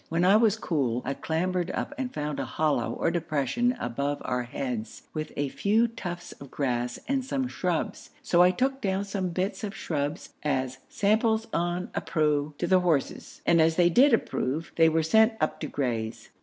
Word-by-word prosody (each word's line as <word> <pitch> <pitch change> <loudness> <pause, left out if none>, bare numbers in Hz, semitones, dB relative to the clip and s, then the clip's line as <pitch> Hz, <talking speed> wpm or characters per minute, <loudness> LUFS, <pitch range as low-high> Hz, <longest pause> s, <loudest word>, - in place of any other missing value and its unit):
When 165 +2 +1
I 195 +3 +6
was 220 -1 +4
cool, 130 - -1
I 135 - -1
clambered 180 +4 -1
up - - -3
and 260 -3 -3
found 150 -1 -3
a - - -1
hollow 155 -2 0
or 165 - 0
depression 170 - 0
above 140 +4 -2
our 125 -1 0
heads, 120 -2 -5
with 155 0 -4
a 145 -1 0
few 220 - +2
tufts 175 -7 -6
of 140 - -12
grass 125 -3 -1
and 270 -1 0
some 265 0 -1
shrubs, 180 -8 -2
so 175 - +4
I 180 - +7
took 265 +8 0
down 195 0 0
some 195 -2 -2
bits 185 +5 -2
of 210 0 -4
shrubs 145 -2 -3
as 130 -3 -1
'samples 220 +2 +2
on 175 +1 -1
appro' 150 -1 0
to - - -1
the 185 -1 +4
horses, 165 -6 -1
and 170 -1 +5
as 160 0 +3
they 175 0 +4
did 275 - +6
approve, 160 - 0
they 165 -1 +6
were 160 0 +1
sent 220 +8 +5
up 155 - 0
to - - -3
graze. 115 -5 -3
165 Hz, 185 wpm, -27 LUFS, 145-200 Hz, -, I